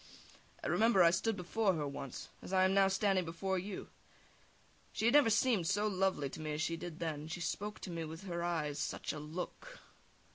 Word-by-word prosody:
I - - -2
remember, 220 -4 +5
I 170 - +7
stood 200 +5 0
before 190 +2 +1
her 150 -2 -2
once, 140 -2 -6
as - - -9
I 185 -1 +4
am 190 0 +4
now 195 0 +5
standing 195 -1 +2
before 185 +3 -2
you. 195 +1 -6 1.0
She - - -2
had 235 - +5
never 290 -5 +7
seemed 220 -6 +3
so 205 +3 +2
lovely 190 -7 +1
to 135 - -8
me 155 -1 -3
as 150 - -2
she 165 - 0
did 165 -1 -7
then, 165 -2 -1
and 155 +2 -8
she 175 - -4
spoke 210 +4 -3
to 185 - -6
me 165 -1 -3
so 160 - -4
with 160 +3 -8
her 170 -3 -3
eyes 155 -4 -1
such - - -2
a 155 - -5
look! 180 - -7
180 Hz, 220 wpm, -35 LUFS, 165-200 Hz, 1.0 s, I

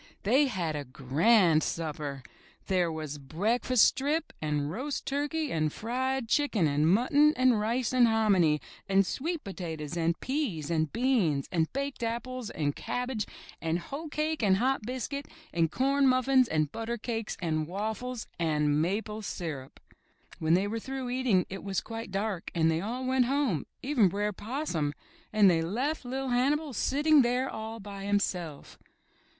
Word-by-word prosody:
They 265 +8 +4
had 175 - -2
a 145 - -3
grand 155 - +3
supper. 150 -5 -3 0.4
There 180 -3 +1
was 155 -2 -5
breakfast 215 - +2
strip, 290 +5 +1
and 150 -1 -1
roast 270 - -4
turkey, 290 +2 -1
and 155 -1 0
fried 260 - -2
chicken, 235 - +2
and 145 +2 +2
mutton, 290 +8 +4
and 255 -3 +4
rice 235 +3 0
and 250 -2 +6
hominy, 195 -9 +3 0.3
and 195 0 +4
sweet 325 - -3
potatoes, 165 -5 -5
and 165 -1 0
peas, 230 - -2
and 160 -2 +1
beans, 225 - +1
and 160 -2 +1
baked 275 -1 -3
apples, 235 +1 -3
and 145 -2 -2
cabbage, 245 -4 -3 0.3
and 165 +1 0
hoe 280 - -6
cake 305 0 -1
and 195 -3 +4
hot 260 +4 +1
biscuit, 260 +3 -4 0.3
and 165 -1 +2
corn 275 +4 +2
muffins, 255 0 +4
and 155 -4 0
butter 230 +1 -3
cakes, 225 -1 -4
and 155 -3 -1
waffles, 220 +6 -4
and 150 -2 +2
maple 210 +5 -2
syrup. 155 -9 -6 0.6
When 160 +1 +3
they 190 +2 +2
were 225 +2 -2
through 265 +1 -5
eating 245 -8 +2
it 195 0 -7
was 195 -2 -1
quite 225 -1 -7
dark, 195 -2 -2
and 165 -1 +3
they 160 +1 0
all 245 +6 -3
went 260 -1 +3
home, 260 - 0 0.2
even 260 -7 +4
Br'er 205 +2 -1
Possum, 205 - -2 0.4
and 210 -2 +5
they 170 -3 +4
left 250 - -1
LiT 260 +1 -3
Hannibal 280 +4 +1
sitting 295 +5 +4
there 250 +2 +1
all 220 -1 -6
by 200 -1 -8
himself. 180 -7 -2
215 Hz, 155 wpm, -29 LUFS, 165-255 Hz, 0.6 s, and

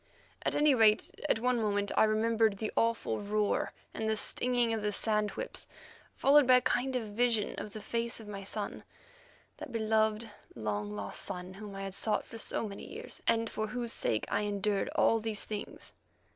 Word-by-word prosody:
At - - 0
any 295 -1 +5
rate, 220 -3 +4 0.2
at - - +4
one 245 +1 +1
moment 205 -1 0
I - - +6
remembered 220 -1 +2
the 215 +1 -3
awful 230 0 +1
roar 210 0 0 0.2
and 220 0 -2
the 220 - +2
stinging 240 +2 +1
of 220 - -1
the 210 0 0
sand 210 0 +1
whips, - - -4 0.5
followed 285 -1 +5
by 255 - +8
a 250 - +5
kind 255 +2 0
of 250 - 0
vision 220 0 +1
of 210 - -6
the 215 - -6
face 235 +3 -2
of 220 - -10
my 200 -1 -6
son—that 205 +6 -8
beloved, 220 0 +1 0.3
long 105 -2 -2
lost 105 -1 -3
son 180 +1 -4
whom 200 0 -8
I 195 - -5
had 195 -1 -5
sought 210 +2 0
for 225 - -9
so 225 - -2
many 200 -1 -8
years, - - -7
and 230 0 +3
for 215 0 -3
whose 235 +1 -2
sake 110 - 0
I - - 0
endured 205 -1 0
all 225 - +4
these 220 -1 -3
things. 210 -1 -5
215 Hz, 185 wpm, -32 LUFS, 205-230 Hz, 0.5 s, by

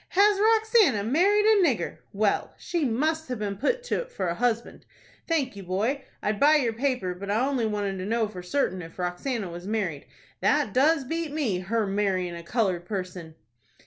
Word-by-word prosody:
"Has 400 +1 +4
Roxanna 435 - +4
married 395 - +3
a 435 -2 +5
nigger? 270 -10 0
Well, 205 0 0
she 340 -4 -2
must 310 +6 0
have 250 - -2
been 205 -2 -3
put 480 - 0
to't - - -2
for 185 - -3
a - - 0
husband. 235 +3 -1 0.4
Thank 285 -9 0
you, 200 - -7
boy. 210 +10 -1 0.2
I'd 210 0 -1
buy 300 +2 +6
your 245 -7 +2
paper, 245 -6 -1
but 195 +3 -8
I 220 +5 +2
only 255 -5 0
wanted 205 -2 -2
to 185 - -4
know 225 +1 +1
for 190 -4 -8
certain 185 -1 -1
if 165 -1 -11
Roxanna 180 +3 -3
was 175 +2 -8
married. 195 -9 -2 0.3
That 290 -9 +2
does 290 +3 +3
beat 325 +3 -3
me,—her 225 -6 -1
marryin' 195 -3 0
a 170 - -7
colored 185 -2 -1
person!" 180 -5 -5
225 Hz, 180 wpm, -26 LUFS, 190-300 Hz, 0.4 s, buy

